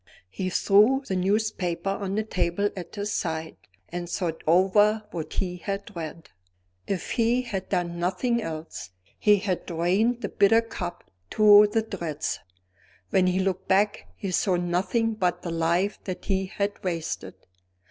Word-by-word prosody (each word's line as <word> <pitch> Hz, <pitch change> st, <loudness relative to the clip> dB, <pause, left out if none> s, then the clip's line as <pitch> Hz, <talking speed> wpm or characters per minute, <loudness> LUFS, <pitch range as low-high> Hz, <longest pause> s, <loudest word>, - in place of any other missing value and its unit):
He 185 Hz, -, -3 dB
threw 215 Hz, +9 st, +4 dB
the 190 Hz, -, -1 dB
newspaper 195 Hz, -2 st, 0 dB
on 195 Hz, -1 st, -3 dB
the 215 Hz, -, +1 dB
table 200 Hz, -1 st, 0 dB
at 180 Hz, 0 st, -8 dB
his 205 Hz, 0 st, -3 dB
side, 160 Hz, -2 st, -3 dB, 0.3 s
and 175 Hz, 0 st, -5 dB
thought 170 Hz, -3 st, -3 dB
over 205 Hz, +5 st, +4 dB
what 160 Hz, -2 st, -5 dB
he 180 Hz, -2 st, -2 dB
had 200 Hz, +2 st, -5 dB
read. 165 Hz, -3 st, -7 dB, 0.6 s
If 195 Hz, -3 st, -3 dB
he 240 Hz, +1 st, +2 dB
had 195 Hz, -6 st, -5 dB
done 175 Hz, -2 st, -1 dB
nothing 215 Hz, +7 st, 0 dB
else, 160 Hz, -, -6 dB, 0.3 s
he 210 Hz, -1 st, +5 dB
had 190 Hz, -2 st, -2 dB
drained 190 Hz, +8 st, +1 dB
the -, -, -3 dB
bitter 225 Hz, +3 st, +4 dB
cup 175 Hz, -6 st, -6 dB, 0.3 s
to 210 Hz, -1 st, +7 dB
the 225 Hz, +1 st, +1 dB
dregs. 170 Hz, -8 st, -4 dB, 0.7 s
When 185 Hz, -1 st, +4 dB
he 180 Hz, 0 st, +1 dB
looked 190 Hz, -1 st, -1 dB
back, 205 Hz, +2 st, +2 dB
he 195 Hz, -, -4 dB
saw 185 Hz, +1 st, +2 dB
nothing 185 Hz, +6 st, 0 dB
but 185 Hz, -5 st, -1 dB
the 170 Hz, -, -3 dB
life 170 Hz, +4 st, 0 dB
that 185 Hz, -2 st, -5 dB
he 190 Hz, -1 st, 0 dB
had 200 Hz, +2 st, -3 dB
wasted. 170 Hz, -4 st, -3 dB
190 Hz, 155 wpm, -26 LUFS, 175-210 Hz, 0.7 s, to